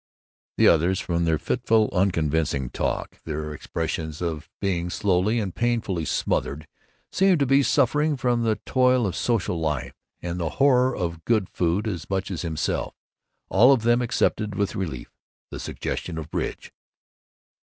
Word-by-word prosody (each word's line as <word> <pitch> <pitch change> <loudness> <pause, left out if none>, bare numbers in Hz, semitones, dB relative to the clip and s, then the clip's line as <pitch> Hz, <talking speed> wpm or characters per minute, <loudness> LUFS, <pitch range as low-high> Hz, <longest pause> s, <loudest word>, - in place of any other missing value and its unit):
The - - +5
others, 85 +3 +3
from 85 -1 -1
their 80 -1 +2
fitful 110 +5 +1
unconvincing 80 -7 0
talk, - - -3
their 75 -1 -4
expressions 80 +1 -4
of 80 -2 -4
being 90 -3 -1
slowly 100 +5 +1
and 100 -5 -3
painfully 115 -8 -1
smothered, 75 0 -1 0.5
seemed 190 -1 +4
to 140 - +3
be 135 +2 +4
suffering 145 +2 +2
from 120 -1 +1
the 110 -2 +1
toil 125 -2 +3
of 95 - -2
social 100 -7 0
life 75 -6 -2 0.3
and 85 0 -4
the 85 -2 -1
horror 130 -2 +4
of 85 -2 -3
good 110 -5 +1
food 90 +5 0
as 90 -7 -4
much 95 0 -2
as 90 - -3
himself. 80 -3 -2 0.5
All 125 +4 +6
of 130 -5 +3
them 120 +1 +3
accepted 110 -3 0
with 100 +2 -1
relief 80 - -4 0.4
the - - -6
suggestion 85 -3 -4
of 80 -1 -7
bridge. - - -4
95 Hz, 150 wpm, -24 LUFS, 80-120 Hz, 0.5 s, All